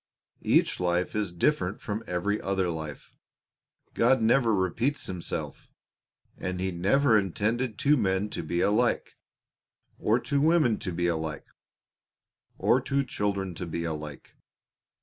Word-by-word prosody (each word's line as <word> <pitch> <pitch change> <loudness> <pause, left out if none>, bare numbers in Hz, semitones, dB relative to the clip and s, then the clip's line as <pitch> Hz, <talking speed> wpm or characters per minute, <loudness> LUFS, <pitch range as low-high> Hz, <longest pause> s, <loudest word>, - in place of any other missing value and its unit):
Each - - +2
life 90 +1 0
is 105 -4 -1
different 90 - 0
from 110 +2 -4
every 95 +4 -1
other 95 -2 0
life. 80 -3 -6 0.8
God 125 +3 +4
never 115 +1 +3
repeats 110 - 0
Himself, 90 -2 -5 0.7
and 90 0 -3
He 95 0 -1
never 110 +7 +3
intended 110 +5 -1
two 145 +6 +3
men 100 -1 0
to - - -3
be 85 +2 -1
alike, 105 +1 +1 0.8
or 110 +3 +2
two 140 +2 0
women 155 -8 +3
to 95 -4 -4
be 85 0 -1
alike, 80 -3 -2 1.1
or 130 - +3
two 140 +1 0
children 100 -5 -2
to 90 +1 -6
be 85 +1 -3
alike. 75 -3 -6
100 Hz, 130 wpm, -28 LUFS, 85-115 Hz, 1.1 s, God